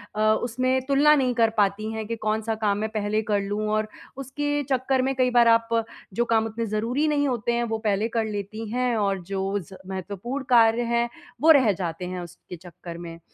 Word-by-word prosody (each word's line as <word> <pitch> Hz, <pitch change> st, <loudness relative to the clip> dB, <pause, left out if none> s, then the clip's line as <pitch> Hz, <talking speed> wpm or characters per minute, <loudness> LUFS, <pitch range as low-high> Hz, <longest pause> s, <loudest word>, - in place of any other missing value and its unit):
अ, -, -, -3 dB, 0.2 s
उसमें 255 Hz, +2 st, 0 dB
तुलना 285 Hz, +2 st, +5 dB
नहीं 255 Hz, -3 st, +1 dB
कर 230 Hz, -2 st, +3 dB
पाती 205 Hz, +2 st, +1 dB
हैं 220 Hz, -1 st, -4 dB
कि 230 Hz, -, -2 dB
कौन-सा 220 Hz, +1 st, -1 dB
काम 210 Hz, -2 st, 0 dB
मैं 215 Hz, +1 st, -2 dB
पहले 215 Hz, 0 st, -1 dB
कर 210 Hz, -2 st, 0 dB
लूँ। 205 Hz, +1 st, -3 dB
और 215 Hz, 0 st, 0 dB, 0.3 s
उसके 290 Hz, +2 st, -2 dB
चक्कर 260 Hz, 0 st, +1 dB
में 270 Hz, +1 st, 0 dB
कई 255 Hz, -1 st, +2 dB
बार 240 Hz, -1 st, +5 dB
आप 230 Hz, 0 st, +4 dB, 0.5 s
जो 235 Hz, +4 st, +1 dB
काम 225 Hz, -1 st, +2 dB
उतने 225 Hz, +1 st, -3 dB
ज़रूरी 230 Hz, +8 st, 0 dB
नहीं 290 Hz, -1 st, +1 dB
होते 240 Hz, -3 st, -1 dB
हैं 240 Hz, 0 st, 0 dB
वो -, -, +1 dB
पहले 215 Hz, 0 st, 0 dB
कर 225 Hz, -, +2 dB
लेती 215 Hz, +1 st, -5 dB
हैं 245 Hz, +1 st, 0 dB
और 200 Hz, -2 st, 0 dB
जो 195 Hz, +2 st, -2 dB
ज़ 190 Hz, +2 st, -12 dB, 0.2 s
महत्वपूर्ण 200 Hz, +8 st, -5 dB
कार्य 230 Hz, -1 st, +5 dB
है, 235 Hz, 0 st, +1 dB, 0.3 s
वो 320 Hz, +2 st, +7 dB
रह 260 Hz, -8 st, +6 dB
जाते 175 Hz, -1 st, -4 dB
हैं 180 Hz, 0 st, -5 dB
उसके 175 Hz, +1 st, -10 dB
चक्कर 170 Hz, 0 st, -10 dB
में। 170 Hz, -1 st, -8 dB
225 Hz, 205 wpm, -25 LUFS, 205-250 Hz, 0.5 s, वो